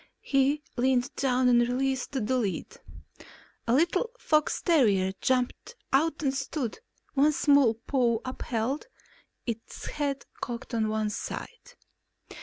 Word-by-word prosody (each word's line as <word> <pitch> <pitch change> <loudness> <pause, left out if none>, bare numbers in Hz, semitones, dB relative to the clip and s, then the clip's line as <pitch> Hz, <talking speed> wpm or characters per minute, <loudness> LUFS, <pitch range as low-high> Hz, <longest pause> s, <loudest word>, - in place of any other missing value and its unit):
He 280 +2 +2
leaned 255 +1 +1
down 255 -1 +2
and 240 -1 +5
released 260 +2 -1
the 265 - -1
lid. 220 -3 -1 0.9
A 230 - +3
little 350 - +2
fox 305 -9 +1
terrier 205 - +3
jumped 255 - 0 0.2
out 310 +3 +2
and 270 -2 +1
stood, 270 - -3 0.3
one 290 +2 +4
small 280 -6 +4
paw 235 0 +1
upheld, 255 - -2 0.6
its 230 -2 -6
head 285 -2 -2 0.2
cocked 240 -2 -5
to 230 - -2
one 215 -1 -1
side. - - -7
260 Hz, 120 wpm, -28 LUFS, 235-285 Hz, 0.9 s, and